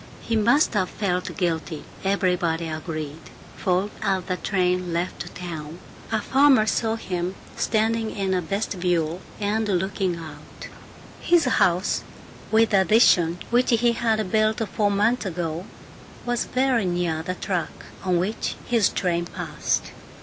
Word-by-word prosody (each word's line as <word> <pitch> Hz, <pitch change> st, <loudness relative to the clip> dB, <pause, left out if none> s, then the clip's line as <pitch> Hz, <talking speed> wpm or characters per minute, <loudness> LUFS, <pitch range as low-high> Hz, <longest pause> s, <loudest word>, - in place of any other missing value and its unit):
He 230 Hz, -, -1 dB
must 235 Hz, +8 st, +4 dB
have 185 Hz, -4 st, +1 dB
felt 180 Hz, -3 st, -2 dB
guilty, 165 Hz, -4 st, -2 dB, 0.2 s
everybody 180 Hz, -4 st, +1 dB
agreed, 155 Hz, -1 st, -5 dB, 0.3 s
for 185 Hz, +3 st, 0 dB
as 190 Hz, -2 st, 0 dB
the 185 Hz, +1 st, -2 dB
train 180 Hz, -2 st, 0 dB
left 175 Hz, +2 st, -3 dB
town, 165 Hz, -3 st, -6 dB, 0.3 s
a 220 Hz, -, +2 dB
farmer 265 Hz, -1 st, +4 dB
saw 225 Hz, +1 st, 0 dB
him 180 Hz, -4 st, -3 dB, 0.2 s
standing 225 Hz, 0 st, +1 dB
in 195 Hz, -3 st, -2 dB
the 185 Hz, -1 st, +1 dB
vestibule 180 Hz, -2 st, -1 dB, 0.2 s
and 215 Hz, +1 st, 0 dB
looking 190 Hz, -1 st, 0 dB
out. 155 Hz, -3 st, -10 dB, 0.5 s
His 340 Hz, -3 st, +3 dB
house 185 Hz, -6 st, +2 dB, 0.5 s
with 225 Hz, 0 st, +4 dB
the 195 Hz, -2 st, +5 dB
addition 180 Hz, -5 st, +4 dB
which 245 Hz, +1 st, +3 dB
he 235 Hz, 0 st, +4 dB
had 220 Hz, -4 st, 0 dB
built 220 Hz, +1 st, +2 dB
four 210 Hz, -1 st, +1 dB
months 210 Hz, +3 st, +1 dB
ago 170 Hz, 0 st, -3 dB, 0.6 s
was 245 Hz, -1 st, 0 dB
very 255 Hz, -4 st, +1 dB
near 175 Hz, -3 st, 0 dB
the 185 Hz, +2 st, -4 dB
track 175 Hz, -4 st, -3 dB, 0.2 s
on 185 Hz, -2 st, +2 dB
which 195 Hz, +6 st, -2 dB
his 230 Hz, -5 st, +3 dB
train 175 Hz, -2 st, -1 dB
passed. -, -, -2 dB
190 Hz, 135 wpm, -24 LUFS, 175-220 Hz, 0.6 s, the